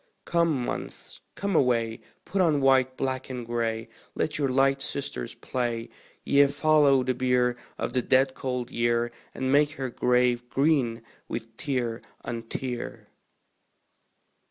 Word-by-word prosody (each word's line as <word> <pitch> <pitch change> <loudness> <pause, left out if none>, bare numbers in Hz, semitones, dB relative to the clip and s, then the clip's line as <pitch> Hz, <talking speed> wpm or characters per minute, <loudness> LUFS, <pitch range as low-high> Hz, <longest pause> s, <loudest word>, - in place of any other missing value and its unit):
Come, 165 -7 +1
Months, - - -6
come 200 -2 -2
away; 115 -5 +2 0.3
Put 190 +1 0
on 160 -5 +3
white, 130 -1 +3
black 130 -1 -2
and 125 -2 -5
gray; 115 -1 -2 0.3
Let 150 - -1
your 140 -2 +1
light 135 +1 +3
sisters 95 - -3
play 120 -2 -3 0.4
Ye, 140 0 +5
follow 145 -2 +4
the 130 0 0
bier 125 -1 +2 0.2
Of - - -3
the 130 - +2
dead 130 +1 +3
cold 125 -2 -3
Year, 120 0 +1 0.2
And 130 0 -1
make 145 +1 +4
her 130 -3 -4
grave 125 0 +2
green 135 -6 +1 0.2
with 115 -1 -6
tear 125 -5 -2 0.2
on 115 -1 -4
tear. 125 -2 -5
130 Hz, 135 wpm, -27 LUFS, 120-140 Hz, 0.4 s, Ye